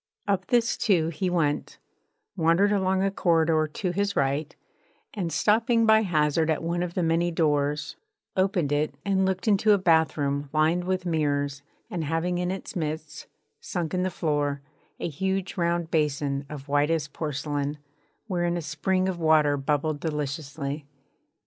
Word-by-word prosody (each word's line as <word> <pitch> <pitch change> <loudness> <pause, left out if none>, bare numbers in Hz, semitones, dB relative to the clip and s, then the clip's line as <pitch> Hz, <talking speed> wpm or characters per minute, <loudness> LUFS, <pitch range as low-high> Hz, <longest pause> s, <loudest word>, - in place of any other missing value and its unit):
Up 190 -2 0
this, 235 -2 +2
too, 180 -8 +2
he 180 +3 -2
went; 155 -5 -1 0.6
wandered 170 +5 +3
along 190 -1 +1
a 195 - +1
corridor 165 -4 +2
to 180 +3 -2
his 200 +2 -1
right, 140 +2 0 0.6
and, 180 -6 -3
stopping 230 +6 +3
by 220 0 +6
hazard 160 -4 +1
at 160 +1 0
one 170 +1 -1
of 175 -1 -3
the 180 - +1
many 165 +1 +2
doors, 150 - 0 0.4
opened 185 -6 +1
it 145 -1 0
and 190 -1 +2
looked 190 0 -2
into 210 +1 +4
a - - +4
bath 165 -4 +3
room 140 0 -1
lined 160 +3 +2
with 185 0 -1
mirrors 145 -4 0 0.3
and 170 -2 -3
having 165 +3 -1
in 180 0 -1
its 190 +1 -5
midst, 155 -2 -4 0.3
sunk 170 -4 -4
in 180 - +1
the 185 - 0
floor, 145 -4 -1 0.4
a - - -2
huge 190 +4 -2
round 170 -2 0
basin 140 -2 0
of 145 -2 -8
whitest 145 +1 +1
porcelain 145 -1 -3 0.5
wherein 175 -4 -1
a - - -3
spring 185 +4 0
of 185 -2 -2
water 155 -3 +4
bubbled 145 +2 -1
deliciously. 145 -1 -4
165 Hz, 155 wpm, -26 LUFS, 150-185 Hz, 0.6 s, by